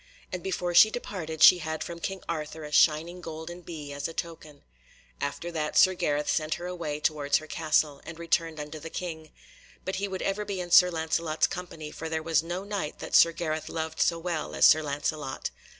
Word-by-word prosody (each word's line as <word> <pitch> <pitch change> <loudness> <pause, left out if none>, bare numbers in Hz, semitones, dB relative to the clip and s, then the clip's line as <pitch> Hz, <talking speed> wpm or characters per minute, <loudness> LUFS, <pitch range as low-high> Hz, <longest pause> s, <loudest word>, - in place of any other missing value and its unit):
And 180 - -3
before 180 -1 -2
she 215 +5 +8
departed 165 -9 -3
she 180 - +9
had 160 -1 -3
from 170 -1 -7
King 195 +2 -4
Arthur 155 -1 -4
a 150 - -8
shining 165 +4 +3
golden 165 +2 -7
bee, 155 -4 -8
as 140 0 -3
a 165 - -9
token. 155 -3 -7 0.6
After 145 +4 -3
that 155 -2 -2
Sir 185 - +7
Gareth 150 -4 -1
set 155 0 0
her 175 - -7
on - - -4
her - - -5
way 150 -4 -4
towards 150 -2 +1
her 155 - -7
castle, 155 -2 0
and 160 0 -9
returned 165 -1 0
unto 150 +1 -6
the 165 +2 -8
King. 160 -3 -6 0.6
But 190 0 -2
he 200 +1 -1
would 190 -1 -4
ever 195 +2 -1
be 200 -2 -4
in 175 -1 -5
Sir 180 +1 +8
Lancelot's 160 -1 0
company, 170 -5 -6
for 160 - -6
there 160 0 -2
was 165 -2 +2
no 175 +3 -4
Knight 200 -7 -4
that - - -8
Sir 170 - +7
Gareth 160 -2 -3
loved 160 -1 -4
so 170 - +3
well 165 -2 -3
as - - +5
Sir 155 - +7
Lancelot. 145 -1 -3
160 Hz, 215 wpm, -28 LUFS, 155-175 Hz, 0.6 s, she